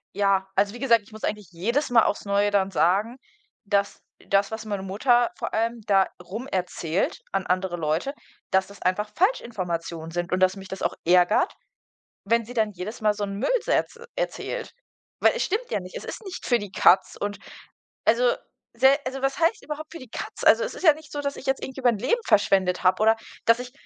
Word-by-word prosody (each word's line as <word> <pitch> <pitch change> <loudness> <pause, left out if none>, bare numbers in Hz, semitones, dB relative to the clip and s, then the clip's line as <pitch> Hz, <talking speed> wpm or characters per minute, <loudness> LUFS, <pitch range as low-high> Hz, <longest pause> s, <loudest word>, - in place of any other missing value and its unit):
Ja, 195 -1 +2
also, 200 +2 +2
wie - - -8
gesagt, 235 -5 +4
ich 210 - -21
muss 215 - -11
eigentlich 210 -4 -3
jedes 235 - 0
Mal 230 -2 +6
aufs 205 - -1
Neue 200 +1 +2
dann 195 -1 +1
sagen, 200 +9 +2 0.5
dass 200 -1 0 0.3
das, 200 0 +2
was 220 0 -5
meine 205 -2 -3
Mutter 240 +5 +2
vor - - -4
allem 230 +1 0
da 195 -2 +4
rum 215 +9 -6
erzählt 180 -1 -2
an 195 -1 -1
andere 185 -1 0
Leute, 160 - -1 0.4
dass 190 -1 +3
das 200 -1 -15
einfach 195 +3 0
Falschinformationen 175 - -1
sind 175 +1 -3
und, 185 - +1
dass 185 +1 +3
mich 195 -1 -10
das 190 - -6
auch - - 0
ärgert, 180 - +4 0.7
wenn 230 +2 +2
sie 245 - -9
dann 220 -3 +1
jedes 195 +4 -7
Mal 210 -1 +3
so 205 - -4
'n 200 -1 -3
Müll - - 0
so - - -2
erz - - +1 0.2
erzählt. - - -4 0.5
Weil - - +6
es - - 0
stimmt 445 +6 -2
ja - - 0
nicht. 185 0 -10
Es - - -8
ist - - -7
nicht 380 - -7
für 240 -2 +3
die 205 -2 -7
Katz 190 - +4
und 205 0 -3 0.7
also, - - +4 0.4
sehr 270 +2 +5
also, 260 +1 -4
was 270 +2 -1
heißt 340 +7 +2
überhaupt 305 +1 -7
für 335 - -8
die 255 -3 -12
Katz? - - -7
Also, 485 - +6
es - - -4
ist - - -9
ja 315 -5 +8
nicht 305 -2 -15
so, 290 - -3
dass 280 0 -3
ich - - -10
jetzt 270 0 0
irgendwie 265 0 -6
mein 240 -3 +4
Leben 470 - +1
verschwendet 190 -3 +3
habe 185 +3 +3
oder 225 +1 +5 0.3
dass 230 +1 +5
ich, 250 0 -7
210 Hz, 215 wpm, -25 LUFS, 190-260 Hz, 0.7 s, ja